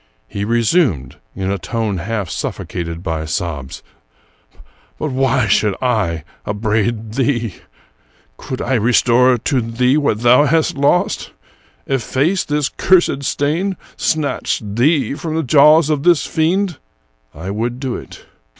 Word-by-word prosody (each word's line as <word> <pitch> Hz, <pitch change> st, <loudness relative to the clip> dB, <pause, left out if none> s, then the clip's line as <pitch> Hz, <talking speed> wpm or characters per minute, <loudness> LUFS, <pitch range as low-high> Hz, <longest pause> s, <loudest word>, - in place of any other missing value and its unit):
He 100 Hz, -, -5 dB
resumed, 115 Hz, -, +1 dB, 0.2 s
in 95 Hz, 0 st, -2 dB
a 100 Hz, -, -2 dB
tone 105 Hz, +4 st, -2 dB
half 105 Hz, +2 st, -3 dB
suffocated 85 Hz, +1 st, -5 dB
by 80 Hz, -3 st, -2 dB
sobs: 80 Hz, -5 st, -4 dB, 0.4 s
— -, -, -37 dB
" -, -, -29 dB
But 155 Hz, -, -3 dB
why 130 Hz, -1 st, +1 dB
should 105 Hz, 0 st, +2 dB
I 105 Hz, -11 st, 0 dB, 0.2 s
upbraid 110 Hz, +1 st, -1 dB
thee? 120 Hz, -5 st, -1 dB, 0.8 s
Could 130 Hz, -, -6 dB
I 130 Hz, -, -1 dB
restore 125 Hz, +2 st, +3 dB
to 130 Hz, +2 st, 0 dB
thee 125 Hz, +4 st, +1 dB
what 130 Hz, -8 st, 0 dB
thou 125 Hz, +4 st, +5 dB
hast 160 Hz, +2 st, +2 dB
lost, 145 Hz, +5 st, +1 dB, 0.6 s
efface 135 Hz, -, 0 dB
this 150 Hz, -1 st, 0 dB
cursed 175 Hz, -6 st, +2 dB
stain, 165 Hz, +8 st, -1 dB, 0.2 s
snatch 155 Hz, -3 st, -1 dB
thee 135 Hz, +9 st, +1 dB
from 155 Hz, +2 st, -4 dB
the 160 Hz, -, 0 dB
jaws 150 Hz, +3 st, +5 dB
of 150 Hz, -2 st, 0 dB
this 175 Hz, 0 st, +3 dB
fiend, 175 Hz, +2 st, 0 dB, 0.6 s
I 90 Hz, +5 st, -6 dB
would 120 Hz, +4 st, -3 dB
do 130 Hz, -3 st, -3 dB
it. -, -, -10 dB
125 Hz, 135 wpm, -17 LUFS, 105-145 Hz, 0.8 s, thou